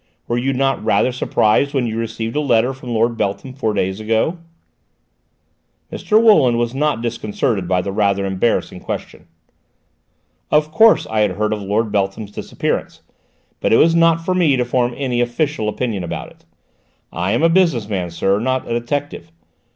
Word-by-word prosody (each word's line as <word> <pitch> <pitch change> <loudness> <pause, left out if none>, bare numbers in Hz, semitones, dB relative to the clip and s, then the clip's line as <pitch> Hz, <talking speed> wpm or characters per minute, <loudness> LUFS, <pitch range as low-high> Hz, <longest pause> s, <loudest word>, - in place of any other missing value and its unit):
Were 120 - -1
you 135 +3 0
not 135 +1 0
rather 130 - +2
surprised 130 +3 +1
when 130 -3 +1
you 110 -1 -3
received 115 0 -4
a 150 - +1
letter 125 -2 +2
from 130 -1 -10
Lord 115 0 0
Beltham 100 +6 -3
four 125 -5 -1
days 95 +1 -1
ago?" 110 +10 0 1.5
Mr. 215 0 +2
Wooland 155 - +5
was 120 0 -1
not 140 -4 -1
disconcerted 110 -3 -2
by 90 0 +1
the 100 - -3
rather 100 -1 +1
embarrassing 95 +4 -1
question. - - -7 1.2
"Of 150 0 +2
course 220 +7 +5
I 110 - -1
had 105 -3 +2
heard 105 +3 -1
of 105 - -4
Lord 105 +2 -1
Beltham's 100 +1 -2
disappearance, - - -4 0.6
but - - 0
it 115 - +6
was 165 +1 +4
not 165 0 +3
for 185 - +1
me 170 -6 +3
to 125 - 0
form 120 0 0
any 125 -3 -1
official 120 -1 -1
opinion 105 -4 -3
about 85 - -6
it. - - -23 0.7
I 90 +4 -1
am 120 - 0
a - - +6
business 165 - +2
man, 95 -5 -3
sir, 95 +4 0
not 130 +3 -1
a 115 - -2
detective. 120 - -4
120 Hz, 175 wpm, -18 LUFS, 105-140 Hz, 1.5 s, it